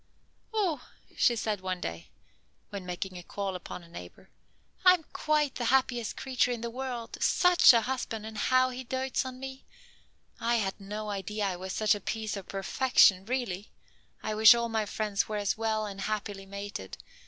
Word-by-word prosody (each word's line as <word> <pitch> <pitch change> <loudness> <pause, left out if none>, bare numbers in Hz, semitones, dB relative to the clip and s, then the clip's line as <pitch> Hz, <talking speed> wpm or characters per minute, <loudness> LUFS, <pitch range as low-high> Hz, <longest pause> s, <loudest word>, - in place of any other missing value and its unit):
"O," 395 -8 0 0.3
she 240 - +4
said 215 -3 -2
one 185 -1 -3
day, 85 - -6 0.6
when 195 -3 -6
making 180 +1 -4
a - - -10
call 195 +1 -4
upon 180 0 -7
a - - -15
neighbor, 170 - -11 0.5
"I'm 365 -2 +6
quite 300 -2 +1
the 240 - -3
happiest 245 -2 +1
creature 255 -2 +1
in 235 -2 -3
the 235 0 -4
world. 245 -2 -5
Such 360 -4 +6
a 235 -2 +4
husband, 225 -3 -3
and 220 0 -7
how 255 +4 +3
he 255 +1 -6
dotes 260 +1 -1
on 255 -1 -7
me! 265 0 -7 0.8
I 235 +1 +1
had 200 -3 -1
no 210 +2 -5
idea 205 +1 -3
I 190 -2 -1
was 185 +1 -6
such 215 0 +3
a 205 - -3
piece 215 +2 -3
of 195 -2 -7
perfection, 195 -1 +3
really. 220 -5 -3 0.5
I 215 - -2
wish 220 +2 +8
all 235 0 -1
my 220 -2 -1
friends 205 -1 -1
were 215 - -2
as 205 -1 0
well 220 -1 -1
and 195 -1 -6
happily 205 -2 -3
mated. 200 - -7
215 Hz, 180 wpm, -29 LUFS, 195-250 Hz, 0.8 s, wish